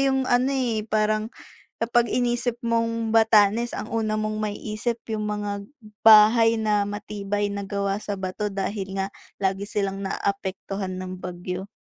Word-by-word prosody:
yung 265 -1 +2
ano, 250 +1 +2
eh, 245 -5 0
parang 215 0 +1 0.5
kapag 235 +1 +2
inisip 240 0 0
mong 230 -1 0
Batanes, 225 +1 +4
ang 215 - -6
una 220 -1 0
mong 215 0 -2
maiisip 215 +2 -2 0.2
yung 215 -1 -2
mga 205 -1 -3 0.4
bahay 225 +1 +7
na 210 -2 +1
matibay 205 0 -3
na 200 -1 -5
gawa 200 0 -1
sa 205 -1 -4
bato 190 +2 -3
dahil 195 0 -4
nga 195 0 -1 0.3
lagi 195 +1 -1
silang 195 -2 -2
naapektuhan 195 -1 -3
ng 185 0 -6
bagyo. 180 +1 -5
210 Hz, 140 wpm, -24 LUFS, 200-225 Hz, 0.5 s, bahay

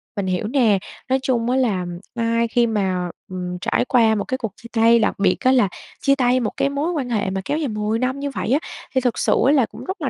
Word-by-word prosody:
Mình 200 -3 -2
hiểu 185 +3 -1
nè, 230 -5 +3 0.3
nói 265 +1 +2
chung 240 -3 0
á 255 - +2
là 210 -9 +1 0.3
ai 230 0 +1
khi 235 +1 +2
mà, 190 -5 -1 0.2
ừm, 180 -1 -4
trải - - +1
qua 230 -4 +3
một 205 - -1
cái 260 - -2
cuộc 225 -5 -4
chia 235 - -13
tay, 230 +1 +6
đặc 215 - 0
biệt 190 -2 +3
á 255 - +3
là 250 -6 +4 0.3
chia 275 -1 +3
tay 255 -1 +2
một 235 - -1
cái 275 - +1
mối 285 +5 -1
quan 280 -7 -3
hệ 210 -5 0
mà 190 0 -3
kéo 295 - -1
dài 310 -2 -1
10 215 0 -1
năm 260 +2 -1
như 285 0 -2
vậy 240 - -3
á, 280 - +4 0.4
thì 260 - +3
thực 245 -2 0
sự - - +2
ấy 275 - +5
là 270 -5 +4
cũng - - -11
rất 375 -1 -5
là 275 - 0
235 Hz, 270 wpm, -21 LUFS, 210-260 Hz, 0.4 s, tay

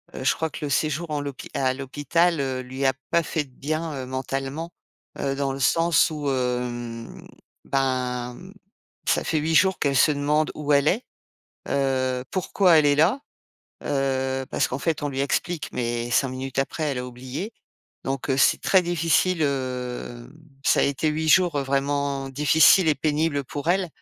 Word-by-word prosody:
heu, - - -5
je - - +3
crois 160 0 -2
que 150 - -8
le - - -3
séjour 155 +4 0
en 150 - -1
l'hôpi 140 -2 -7
à 130 -1 +1
l'hôpital, 145 +5 0
heu, 130 -2 -1
lui 130 +2 -4
a 135 - +4 0.2
pas 170 - +2
fait 160 -1 -2
de - - -21
bien 150 0 -4
mentalement, 135 +5 -4 0.5
heu, 135 -1 -1
dans 140 -1 -1
le 135 - -5
sens 165 +5 +3
où, 145 -2 -3
hem, 125 -2 -3 0.4
ben, 125 -2 -1 0.7
ça - - +2
fait 160 - +1
8 160 +2 0
jours 190 +3 +4
qu'elle 140 -2 +1
se 150 - +5
demande 150 +2 +1
où 150 -1 -2
elle 140 +1 +4
est, 220 +10 +1 0.6
heu, 130 -2 0
pourquoi 185 -2 +3
elle 150 - +2
est 145 - +4
là, 175 - +3 0.6
heu, 135 -1 -1
parce - - +1
qu'en 130 - -3
fait, 155 +1 -1
on 145 - -1
lui 135 -1 -3
explique 155 +4 -1
mais 120 0 -2
5 135 - +3
minutes 130 +1 -5
après, 155 +3 -2
elle 140 -4 -1
a 125 - -3
oublié 130 - -6 0.5
donc 135 +1 -3
heu, 130 - +2
c'est - - +4
très 190 -2 +4
difficile, 170 0 +1
hem, 125 -3 -3 0.3
ça - - +4
a - - +4
été 140 +2 0
8 155 +1 -1
jours 175 -2 +4
vraiment 140 0 -1
difficiles 160 +6 +5
et 150 - +4
pénibles 150 -1 0
pour 145 +3 -6
elle 185 0 +2
140 Hz, 175 wpm, -24 LUFS, 130-155 Hz, 0.7 s, se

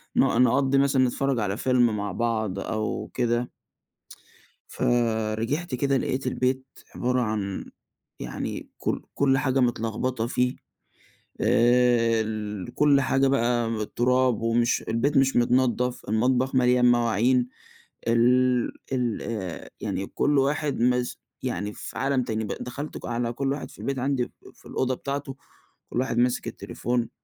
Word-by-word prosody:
ن - - +2 0.2
نقضّي 135 +2 +3
مثلًا 135 -1 +3
نتفرج 135 0 0
على 105 0 -1
فيلم 120 -4 +2
مع 100 -1 -3
بعض 110 -2 -1
أو 110 +1 -3
كده 120 0 0 1.2
فرجعت 115 +5 0
كده 140 +1 +1
لقيت 130 0 -2
البيت 130 +1 0 0.3
عبارة 125 0 +1
عن 105 -4 -2 0.5
يعني - - -5
كُلّ - - -2
كُلّ 135 -1 +3
حاجة 135 -1 +1
متلخبطة 120 0 0
فيه. 125 0 0 0.9
آآ، 120 -1 +4
ال 105 -3 -5
كُلّ 145 -2 +4
حاجة 135 0 +2
بقى 120 -3 +2 0.2
التراب 125 +2 +1
ومش 115 +1 +2
البيت 135 +6 +1
مش 135 0 +3
متنضّف، 125 +1 +2
المطبخ 125 +4 +1
مليان 125 -1 +4
مواعين، 120 +1 +2 0.6
ال 125 +1 +3 0.2
ال 125 -4 -1
آآ، 95 -7 -5
يعني 95 - -3
كُلّ 145 +6 +1
واحد 145 0 0
مس 125 0 +1 0.2
يعني 105 +1 -3
في - - -8
عالم 135 0 +1
تاني. 110 -1 -2
ب - - -5
دخلت 140 +5 -6
ك - - -9
على 120 0 -1
كُلّ 135 +2 -1
واحد 145 - -5
في - - -16
البيت 135 -1 -3
عندي 130 -1 -1 0.2
في - - -22
الأوضة 130 0 0
بتاعته، 140 +1 -5 0.5
كُلّ 125 - 0
واحد 130 -3 -1
ماسك 125 0 +1
التليفون 120 -1 -3
125 Hz, 135 wpm, -25 LUFS, 115-130 Hz, 1.2 s, آآ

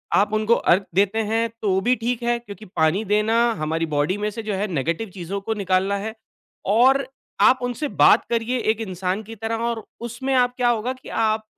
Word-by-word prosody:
आप 205 +1 +2
उनको 215 +1 +3
अर्घ 185 -3 +3
देते 200 +3 +2
हैं, 225 +1 0
तो 190 -3 +1
भी 245 +5 +2
ठीक 240 +1 -2
है 240 0 +1
क्योंकि 215 -2 -11
पानी 175 +2 +1
देना 210 +3 +2 0.2
हमारी 160 +2 -1
बॉडी 150 +7 +1
में 210 +1 -1
से 225 +2 -6
जो 215 -1 -3
है 200 +2 -1
नेगटिव 165 +9 -2
चीज़ों 190 +1 -5
को 220 +3 -2
निकालना 195 -1 0
है 215 +2 -5 0.6
और 265 +4 +4 0.4
आप 255 - +6
उनसे 245 +4 -2 0.2
बात - - +6
करिए 235 +2 0
एक 220 -1 0
इंसान 190 0 -3
की 225 +2 -10
तरह 225 +2 -3
और 225 -2 -4 0.2
उसमें 260 +3 -2 0.2
क्या 245 -1 +2
होगा 240 +2 0
कि 260 - -14
आप 220 -1 0
215 Hz, 195 wpm, -22 LUFS, 195-235 Hz, 0.6 s, आप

